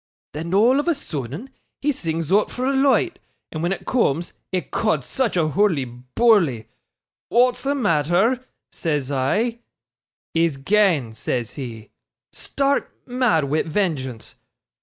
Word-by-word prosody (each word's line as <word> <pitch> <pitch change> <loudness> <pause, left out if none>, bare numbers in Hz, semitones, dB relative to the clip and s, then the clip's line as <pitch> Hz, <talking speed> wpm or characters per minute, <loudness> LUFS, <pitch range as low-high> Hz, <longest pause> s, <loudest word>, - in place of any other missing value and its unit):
Then 165 +5 -3
all 240 +7 +5
of 295 - -2
a 340 - +3
soodden, 155 - -6 0.3
he 295 +2 +1
sings 165 - -3
oot 205 +2 +4
for 250 - -3
a 275 - +1
loight, 275 +7 +2 0.3
and 155 - -4
when 175 +2 0
it 195 - -4
cooms 170 - 0 0.2
ecod, 160 -4 0
such 235 - -1
a 160 -3 +2
hoorly 170 -5 +2 0.3
boorly! 180 - +4 0.6
"Wa'at's 245 +1 +3
the 280 +1 0
matter?" 205 - +2 0.3
says 145 -5 -2
I. 210 - 0 0.7
"He's 165 -3 +1
gane," 160 - +2
says 120 +1 -2
he, 115 -6 -8 0.4
stark 280 0 -1
mad 245 - +2
wi' 145 +3 +1
vengeance. 150 - -2
175 Hz, 135 wpm, -22 LUFS, -, 0.7 s, all